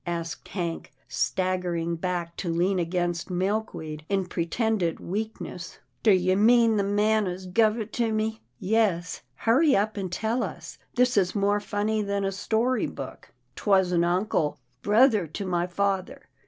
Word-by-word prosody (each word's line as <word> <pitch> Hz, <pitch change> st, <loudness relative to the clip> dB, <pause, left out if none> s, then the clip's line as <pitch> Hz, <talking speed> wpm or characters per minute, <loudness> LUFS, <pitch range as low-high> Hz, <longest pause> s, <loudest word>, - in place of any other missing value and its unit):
asked 170 Hz, -1 st, -4 dB
Hank, 170 Hz, -4 st, -4 dB, 0.2 s
staggering 180 Hz, -2 st, -1 dB
back 170 Hz, 0 st, -3 dB
to 175 Hz, -, -3 dB
lean 180 Hz, +3 st, +1 dB
against 175 Hz, 0 st, -1 dB
Milkweed 180 Hz, -5 st, -2 dB
in 195 Hz, -2 st, +1 dB
pre 170 Hz, -1 st, -3 dB
tended 215 Hz, -4 st, 0 dB
weakness. 200 Hz, -3 st, -5 dB
" -, -, -45 dB
Do 225 Hz, -, +3 dB
you 185 Hz, 0 st, +3 dB
mean 225 Hz, +1 st, +5 dB
the 200 Hz, -, +2 dB
man 210 Hz, +1 st, +2 dB
as 180 Hz, +1 st, -5 dB
guv 215 Hz, +4 st, +2 dB
it 220 Hz, 0 st, -6 dB
to 230 Hz, -2 st, 0 dB
me? 220 Hz, 0 st, -1 dB
" -, -, -46 dB
" -, -, -44 dB, 0.2 s
Yes, 180 Hz, -6 st, 0 dB
hurry 270 Hz, +6 st, +3 dB
up 210 Hz, +2 st, 0 dB
and 190 Hz, -3 st, -3 dB
tell 220 Hz, +6 st, -1 dB
us -, -, -6 dB
— -, -, -38 dB
this 250 Hz, -2 st, +3 dB
is 185 Hz, -1 st, +2 dB
more 205 Hz, 0 st, +2 dB
funny 210 Hz, +1 st, -1 dB
than 200 Hz, -1 st, -1 dB
a 195 Hz, -, 0 dB
story 225 Hz, +6 st, 0 dB
book." -, -, -9 dB
" -, -, -44 dB
'Twas 190 Hz, -3 st, +2 dB
an 170 Hz, -1 st, +3 dB
uncle 175 Hz, -3 st, 0 dB
— 125 Hz, +1 st, -43 dB
brother 215 Hz, -3 st, +4 dB
to 195 Hz, +6 st, -5 dB
my 175 Hz, -1 st, 0 dB
father. 195 Hz, 0 st, -2 dB
195 Hz, 180 wpm, -26 LUFS, 175-215 Hz, 0.2 s, mean